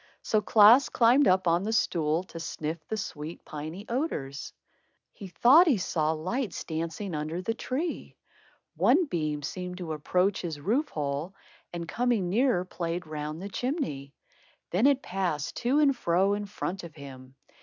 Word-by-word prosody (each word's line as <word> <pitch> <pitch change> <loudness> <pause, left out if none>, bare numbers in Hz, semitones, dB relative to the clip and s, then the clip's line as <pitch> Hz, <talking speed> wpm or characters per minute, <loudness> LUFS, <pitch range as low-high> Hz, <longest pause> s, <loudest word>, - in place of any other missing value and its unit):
So 215 - +1
Klaas 220 +6 +6
climbed 250 +4 +4
up 185 0 +3
on 170 +1 +3
the 210 +3 -2
stool 165 -6 +1
to 170 -2 -10
sniff 160 0 -4
the 220 - -3
sweet 160 -5 -6
piny 155 +7 -7
odors. 230 - -3 0.6
He 200 - -9
thought 270 - +6
he 270 -8 +4
saw 160 -4 0
lights 185 - -3
dancing 165 +4 -4
under 155 +3 -3
the 225 - -1
tree. 280 +8 -4 0.6
One 360 - +4
beam 155 - -2
seemed 180 +4 -5
to 170 -4 -4
approach 180 +6 0
his 160 -4 -5
roof 240 - 0
hole, 150 +5 -3 0.4
and 170 -1 -5
coming 230 -4 0
nearer 230 -4 +2
played 175 -1 -4
round 155 0 -5
the 200 - -5
chimney. 195 - -3 0.6
Then 200 +10 +4
it 275 -1 +2
passed 180 -6 -2
to 250 +4 +1
and 285 -3 +4
fro 190 -1 +2
in 205 0 -3
front 190 -2 -4
of 165 -2 -10
him. 135 -2 -11
180 Hz, 160 wpm, -28 LUFS, 155-225 Hz, 0.6 s, Klaas